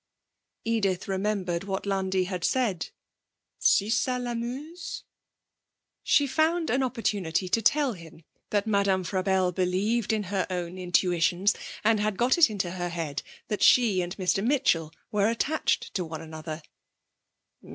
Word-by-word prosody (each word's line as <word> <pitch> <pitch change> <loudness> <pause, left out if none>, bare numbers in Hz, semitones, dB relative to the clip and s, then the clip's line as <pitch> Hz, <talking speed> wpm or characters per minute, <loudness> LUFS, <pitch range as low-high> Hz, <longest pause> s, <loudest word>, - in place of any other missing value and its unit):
Edith 200 -5 0
remembered 190 -3 -1
what 195 0 -3
Landi 190 -1 0
had 180 -1 -4
said: 225 -10 0 0.7
'Si 205 +1 +3
ça 250 +2 +1
l'amuse?' 250 +8 -5 1.0
She 290 - +3
found 320 +4 +1
an 260 - +2
opportunity 205 -9 -1
to 225 - +2
tell 280 +3 +3
him 165 -3 -13 0.3
that 205 0 +1
Madame 200 -3 +2
Frabelle 185 0 +1
believed 190 +6 0
in 215 -1 0
her 190 -2 0
own 180 0 -4
intuitions, 180 +1 +2 0.3
and 220 0 +3
had 210 -1 -1
got 250 +7 +3
it 320 - +7
into 190 -5 -2
her 175 -1 -3
head 165 -4 -3 0.3
that 210 - -3
she 220 -7 +5
and 175 +2 -5
Mr. 195 0 +1
Mitchell 225 - +2 0.2
were 210 0 +2
attached 280 +7 0
to 185 - -1
one 160 -1 -6
another. 155 0 -7
195 Hz, 140 wpm, -27 LUFS, 180-230 Hz, 1.0 s, it